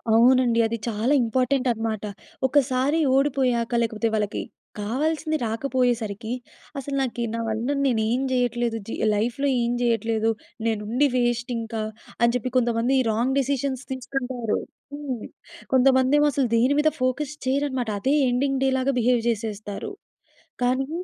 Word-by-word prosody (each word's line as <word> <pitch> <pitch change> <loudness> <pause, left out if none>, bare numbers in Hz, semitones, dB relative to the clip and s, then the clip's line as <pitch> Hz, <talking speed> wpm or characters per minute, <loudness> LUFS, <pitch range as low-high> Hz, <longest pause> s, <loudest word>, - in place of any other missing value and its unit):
అవునండి. 245 0 +5
అది 230 +1 -3
చాలా 225 +5 +1
ఇంపార్టెంట్ 255 +3 +1
అనమాట. 225 -2 -3 0.4
ఒకసారి 265 +2 +2 0.2
ఓడిపోయాక 260 -4 +1
లేకపోతే 225 0 0
వాళ్ళకి 210 -1 -1 0.4
కావాల్సింది 310 +8 -1
రాకపోయేసరికి, 230 -2 -1 0.5
అసలు 275 +1 -4
నాకి 245 -2 -2
నా - - -2
వల్ల 225 +3 -2 0.2
నేనేం 235 0 +1
చేయట్లేదు. 240 -2 0
జి - - -5 0.2
లైఫ్‌లో 235 +6 0
ఏం 235 0 0
చేయట్లేదు. 225 -1 +1 0.4
నేనుండి 225 +4 +1
వేస్ట్ 240 0 0
ఇంకా 225 -1 -4 0.4
అని 235 0 +4
చెప్పి 250 +1 -1
కొంతమంది 240 +2 +2
రాంగ్ 240 +5 0
డిసిషన్స్ 275 -1 -1
తీసుకుంటారు. 250 -2 -2 0.4
హ్మ్. 270 -6 -5 0.5
కొంతమందేమో 260 +3 +4
అసలు 270 -2 +1
దేని 250 +5 +3
మీద 310 +1 +3
ఫోకస్ 265 +3 0
చెయ్యరనమాట. 260 -3 0
అదే 270 +5 +2 0.2
ఎండింగ్ 265 +2 0
డే 270 - +3
లాగా 265 +1 +1
బిహేవ్ 245 0 +3
చేసేస్తారు. 215 - -4 0.7
కానీ 260 +2 +1
245 Hz, 125 wpm, -24 LUFS, 230-265 Hz, 0.7 s, అవునండి